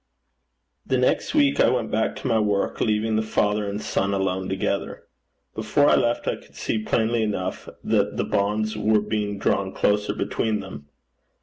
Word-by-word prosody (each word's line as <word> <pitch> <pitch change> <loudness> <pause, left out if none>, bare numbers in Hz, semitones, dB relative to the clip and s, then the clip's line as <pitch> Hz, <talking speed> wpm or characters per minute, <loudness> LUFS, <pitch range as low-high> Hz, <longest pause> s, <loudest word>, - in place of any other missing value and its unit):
The 130 - 0
next 125 - +1
week 285 -2 +3
I - - +5
went 120 -3 -1
back 110 +1 0
to - - -5
my 110 - +2
work, 105 -2 0
leaving 110 0 +1
the - - +2
father 105 -1 0
and 100 +1 -4
son 100 -2 -1
alone 95 -1 -1
together. 95 +1 -2 0.5
Before 145 - +1
I - - +6
left, 120 0 0
I - - 0
could - - -20
see 110 - -2
plainly 115 +1 0
enough 105 -4 -3
that - - +1
the - - 0
bonds 110 +2 0
were 105 0 +3
being 105 -1 -2
drawn 95 -1 0
closer 105 +1 +1
between 110 -2 -1
them. 75 -8 -9
105 Hz, 175 wpm, -24 LUFS, 100-110 Hz, 0.5 s, I